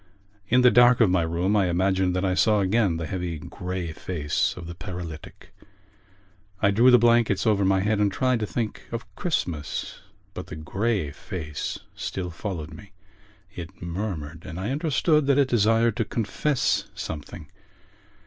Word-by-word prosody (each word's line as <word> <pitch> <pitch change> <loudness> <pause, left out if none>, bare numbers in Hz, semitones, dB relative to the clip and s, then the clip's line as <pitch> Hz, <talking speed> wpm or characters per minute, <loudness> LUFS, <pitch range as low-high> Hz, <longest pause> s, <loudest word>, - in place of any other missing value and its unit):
In 125 +5 +4
the 125 -1 +6
dark 120 0 +6
of 110 -6 +5
my 90 -1 +3
room 85 +5 0
I 100 -3 +3
imagined 95 +1 +1
that 90 +1 0
I 95 - +1
saw 105 +3 +3
again 95 -3 +2
the 80 - -4
heavy 90 0 -3
grey 90 +2 -5
face 80 -3 -1
of 85 - -7
the 85 - -7
paralytic. 85 -3 -8 1.1
I 100 - +3
drew 115 +6 +5
the 125 - +8
blankets 120 -3 +3
over 105 -3 +3
my 95 0 +3
head 105 +1 +1
and 105 -1 +2
tried 130 +3 +1
to 105 - -2
think 115 -1 -3
of 115 0 -4
Christmas. 85 - -3 0.3
But 90 - -7
the 90 - -7
grey 95 +1 -1
face 75 0 -5 0.2
still 90 -2 -4
followed 85 -4 -5
me. 100 -1 -13 0.6
It 90 0 -9
murmured; 85 -3 -5
and 90 0 -7
I 100 +6 -2
understood 150 0 +2
that 140 -1 +4
it 140 -2 +3
desired 115 -1 +3
to - - +2
confess 120 +7 0
something. 75 -2 -7
95 Hz, 165 wpm, -25 LUFS, 85-115 Hz, 1.1 s, the